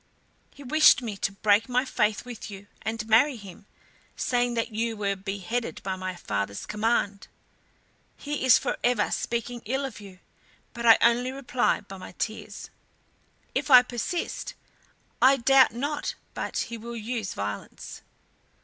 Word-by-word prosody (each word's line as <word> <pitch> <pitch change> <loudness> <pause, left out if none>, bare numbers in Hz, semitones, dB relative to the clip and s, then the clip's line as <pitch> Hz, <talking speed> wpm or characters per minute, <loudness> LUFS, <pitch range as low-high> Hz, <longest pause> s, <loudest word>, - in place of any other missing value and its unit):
He 285 - -14
wishes 305 0 +5
me 220 -4 -4
to 195 - -1
break 205 +3 +2
my 250 +2 +1
faith 210 -4 0
with 240 -3 -8
you 200 0 -10 0.2
and 220 0 -4
marry 250 +6 +4
him, 200 -2 -12 0.5
saying 245 -1 0
that 230 0 -1
you 225 +1 -2
were 200 -1 -1
beheaded 195 +5 -4
by 190 -1 -2
my 185 0 -5
father's 100 -9 -3
command. 210 -2 -1 0.9
He 295 -1 -4
is 260 -2 +7
forever 240 -4 0
speaking 235 0 -3
ill 265 +5 -1
of 250 -6 -7
you, 195 -2 -12 0.6
but 235 0 -2
I 225 - +9
only 240 +2 +3
reply 255 -4 0
by 195 -1 -11
my 185 - -10
tears. 220 +4 -5 0.8
If - - -2
I 250 -2 +9
persist, 250 +8 -4 0.7
I 270 +1 +6
doubt 265 +1 +5
not 285 +6 -3 0.2
but - - -4
he 235 -1 -3
will 235 +2 -7
use 225 -2 -4
violence." 100 0 -6
230 Hz, 150 wpm, -26 LUFS, 200-250 Hz, 0.9 s, I